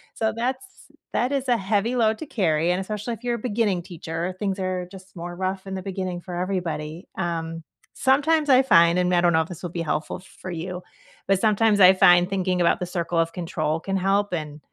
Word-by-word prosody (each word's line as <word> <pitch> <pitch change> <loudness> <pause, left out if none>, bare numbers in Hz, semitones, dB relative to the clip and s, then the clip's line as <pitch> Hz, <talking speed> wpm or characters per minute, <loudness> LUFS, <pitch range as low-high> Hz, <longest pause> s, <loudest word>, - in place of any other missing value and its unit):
so, 220 -1 0
that's 255 +9 -2 0.5
that 250 +3 +1
is 275 -2 -1
a 245 - +4
heavy 210 +5 0
load 220 -2 +2
to 315 - -7
carry 170 - +1
and 185 +2 0
especially 210 +4 -4
if 230 - -10
you're 240 -1 0
a 235 - -6
beginning 210 -6 0
teacher, 170 +1 -5
things 195 -1 -2
are 185 -1 -2
just 190 0 -13
more 175 0 -6
rough 190 +1 -3
in 195 0 -5
the 190 - -4
beginning 185 -2 -4
for 175 0 -8
everybody, 175 -3 -3
um, 165 -2 -3 0.3
sometimes 290 +3 +2
I 260 0 +6
find, 170 -7 +5
and 180 0 +2
I 175 - +4
don't 175 - +4
know 160 -1 +3
if 160 - -4
this 180 -1 -10
will 175 - -3
be 170 0 -4
helpful 155 -1 -2
f 185 - -16 0.2
for 185 - -5
you, 180 +2 -5 0.4
but 195 -1 +2
sometimes 215 0 +3
I 185 0 +9
find 180 -1 +5
thinking 185 -2 0
about 170 +1 +2
the - - 0
circle 175 -1 -3
of 165 0 +2
control 165 -2 -2
can 195 +3 -3
help, 195 +1 +1
and 150 -3 -4
185 Hz, 225 wpm, -24 LUFS, 175-210 Hz, 0.5 s, I